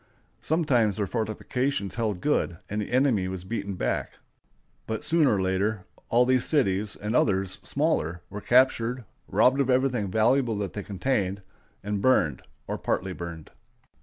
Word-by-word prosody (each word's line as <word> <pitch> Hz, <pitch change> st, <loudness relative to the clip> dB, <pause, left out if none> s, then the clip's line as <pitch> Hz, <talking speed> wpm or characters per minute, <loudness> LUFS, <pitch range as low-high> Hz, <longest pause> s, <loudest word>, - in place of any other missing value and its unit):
Sometimes 125 Hz, -, +2 dB
their 105 Hz, -, 0 dB
fortifications 110 Hz, +1 st, -2 dB
held 110 Hz, -6 st, -2 dB
good, 120 Hz, -, 0 dB
and 105 Hz, 0 st, -1 dB
the -, -, -6 dB
enemy 125 Hz, -7 st, +2 dB
was 95 Hz, -1 st, -5 dB
beaten 100 Hz, -1 st, -4 dB
back; -, -, -2 dB, 0.7 s
but 110 Hz, -1 st, -3 dB
sooner 155 Hz, -8 st, +3 dB
or 95 Hz, -, 0 dB
later 95 Hz, +2 st, -1 dB, 0.2 s
all 120 Hz, +2 st, +4 dB
these 130 Hz, -1 st, +3 dB
cities, 105 Hz, -8 st, +1 dB
and 105 Hz, +3 st, -3 dB
others, 95 Hz, -4 st, +1 dB
smaller, 110 Hz, -, -1 dB
were 105 Hz, +2 st, -7 dB
captured, 125 Hz, -1 st, +2 dB, 0.2 s
robbed 125 Hz, +7 st, +3 dB
of 135 Hz, -, 0 dB
everything 125 Hz, -5 st, +1 dB
valuable 115 Hz, +3 st, +2 dB
that 100 Hz, -2 st, -3 dB
they 105 Hz, -, -4 dB
contained, 100 Hz, -1 st, -2 dB, 0.4 s
and 105 Hz, 0 st, -2 dB
burned 85 Hz, -, +2 dB, 0.2 s
or -, -, -4 dB
partly 95 Hz, 0 st, -1 dB
burned. 85 Hz, -3 st, -8 dB
110 Hz, 150 wpm, -26 LUFS, 95-125 Hz, 0.7 s, all